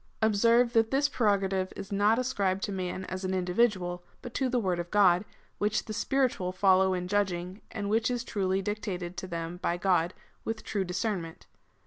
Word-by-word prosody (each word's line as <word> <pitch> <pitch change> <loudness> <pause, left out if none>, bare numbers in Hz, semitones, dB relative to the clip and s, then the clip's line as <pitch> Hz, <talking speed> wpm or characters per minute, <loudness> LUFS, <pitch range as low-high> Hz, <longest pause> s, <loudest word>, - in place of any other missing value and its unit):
'" - - -38
Observe, 235 +3 +4
that 225 -1 +3
this 275 +3 +2
pre 245 -6 0
rogative 195 -2 +1
is 195 - -8
not 205 +3 +3
ascribed 200 -7 0
to 205 - -2
the - - -3
man 185 +1 -3
as 185 +1 -5
an 190 0 -1
individual, 180 -1 +1 0.2
but 245 -2 -7
to 265 -2 0
the 250 - +1
word 185 -6 0
of 175 0 -4
God, 185 -2 +4 0.4
which 210 +1 0
the 215 - -5
spiritual 235 -6 0
follow 190 0 +4
in 180 0 -3
judging, 185 -1 -1
and 205 -2 -4
which 225 +3 +2
is 245 -1 -1
truly 195 -4 -1
dictated 185 -4 -4
to 185 - -5
them 170 0 -4
by 175 -1 -1
God 175 -2 +1 0.3
with 225 0 -4
true 200 -2 -1
discern 190 +2 -1
ment. 165 -1 -10
195 Hz, 200 wpm, -29 LUFS, 180-220 Hz, 0.4 s, Observe